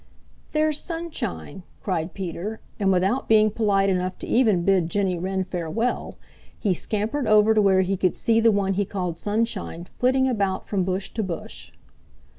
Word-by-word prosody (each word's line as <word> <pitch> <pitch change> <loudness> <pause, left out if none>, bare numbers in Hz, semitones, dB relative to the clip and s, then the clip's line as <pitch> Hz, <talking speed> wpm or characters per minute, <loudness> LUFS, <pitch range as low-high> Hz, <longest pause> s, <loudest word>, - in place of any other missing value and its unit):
"There's 310 -1 +1
Sunshine!" 310 - -5 0.2
cried 175 -3 -2
Peter, 195 +3 -5 0.2
and 195 -2 +2
without 190 +8 +1
being 215 -1 +5
polite 200 -3 +2
enough 185 -1 -1
to - - -7
even 215 -8 +3
bid 185 -4 +3
Jenny 185 -1 0
Wren 190 +1 -1
farewell, 185 +7 -3 0.4
he 200 -4 +1
scampered 220 - -1
over 215 0 +5
to 215 - +4
where 190 -2 +4
he 195 +1 0
could 185 -1 +1
see 225 -1 +2
the 230 0 +5
one 200 -1 +1
he 200 +2 +1
called 180 -4 -3
Sunshine 205 -4 -2
flitting 260 +1 +3
about 200 -6 -1
from 195 -3 0
bush 190 +1 -2
to 225 - -2
bush. 185 -5 -6
195 Hz, 165 wpm, -24 LUFS, 185-220 Hz, 0.4 s, being